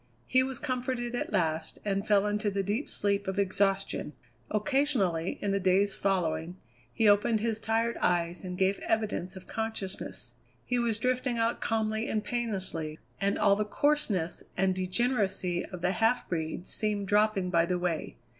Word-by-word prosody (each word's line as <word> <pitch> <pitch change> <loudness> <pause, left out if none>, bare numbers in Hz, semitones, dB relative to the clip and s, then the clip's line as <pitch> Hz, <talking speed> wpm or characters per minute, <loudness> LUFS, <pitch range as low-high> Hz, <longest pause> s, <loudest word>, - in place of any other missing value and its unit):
He 255 - +4
was 260 -1 -2
comforted 250 -1 -2
at 245 - -2
last, 160 -5 0
and 200 -1 -1
fell 205 -1 +4
into 210 0 0
the 200 0 -1
deep 210 +9 -2
sleep 200 -1 0
of 190 +1 -2
exhaustion. 195 -4 +1 0.4
Occasionally, 210 - +1
in 200 - +1
the 200 - +1
days 195 +2 +3
following, 175 -3 0 0.3
he 215 - +2
opened 210 +2 +4
his 225 -1 0
tired 225 +1 0
eyes 175 0 0
and 180 -1 -5
gave 190 +1 +2
evidence 210 -4 -1
of 185 - -10
consciousness. 220 -4 -5 0.3
He 245 -1 0
was 230 -3 +1
drifting 250 +1 0
out 230 +1 +1
calmly 220 0 0
and 215 -1 0
painlessly, 190 -9 -3 0.2
and 200 -1 +1
all 200 -1 +4
the 210 - 0
coarseness 210 - 0 0.2
and 190 0 +3
degeneracy 190 -2 0
of 180 -2 -8
the 180 - +2
half 225 +4 +2
breed 160 +1 -3
seemed 205 -1 -1
dropping 205 -3 +2
by 170 -1 +3
the 180 0 +1
way. 175 -2 -2
200 Hz, 165 wpm, -29 LUFS, 185-225 Hz, 0.4 s, He